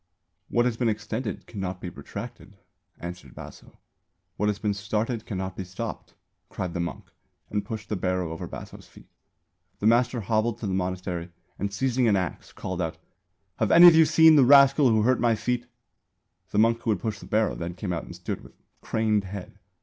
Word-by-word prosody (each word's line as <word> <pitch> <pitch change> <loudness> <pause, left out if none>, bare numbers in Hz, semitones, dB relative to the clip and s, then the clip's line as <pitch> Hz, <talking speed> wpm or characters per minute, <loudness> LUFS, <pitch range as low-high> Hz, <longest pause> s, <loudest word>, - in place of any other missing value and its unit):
"What 120 0 +2
has 120 -2 0
been 120 -2 +1
extended 110 +1 -4
cannot 95 -3 -5
be 90 - -6
retracted," - - -9 0.4
answered 85 -7 -8
Baso. - - -12 0.6
"What 105 +1 0
has 105 - -1
been 105 -1 -1
started 110 +3 -2
cannot 95 -2 -4
be 95 - -4
stopped," 90 0 -7 0.3
cried 90 -2 -4
the 90 - -3
monk 85 +1 -5 0.4
and 105 -1 -1
pushed 110 -2 -6
the 105 - -1
barrow 90 -2 -1
over 80 - -6
Baso's - - -10
feet. - - -18 0.7
The - - -4
master 120 +1 +3
hobbled 110 +2 0
to 120 - -6
the 95 - -1
monastery 90 -2 -3 0.3
and 100 +1 -2
seizing 125 +3 +1
an 105 - +4
axe 90 -2 -3
called 95 -1 -5
out 80 -2 -3 0.6
"Have - - +1
any 170 +1 +9
of 175 - +10
you 160 0 +7
seen 160 0 +6
the 140 - +7
rascal 140 +1 +7
who 110 -2 +3
hurt 130 +2 +3
my 115 -1 +3
feet?" 120 +3 -2 0.8
The - - -3
monk 115 +2 +4
who 115 - -3
had 105 -4 +1
pushed 105 0 -3
the - - -11
barrow 110 0 +1
then 85 0 -5
came 90 -1 -3
out 85 - -3
and - - -10
stood - - -5
"with - - -15 0.3
craned 110 -2 0
head." 95 0 -8
105 Hz, 195 wpm, -26 LUFS, 95-120 Hz, 0.8 s, of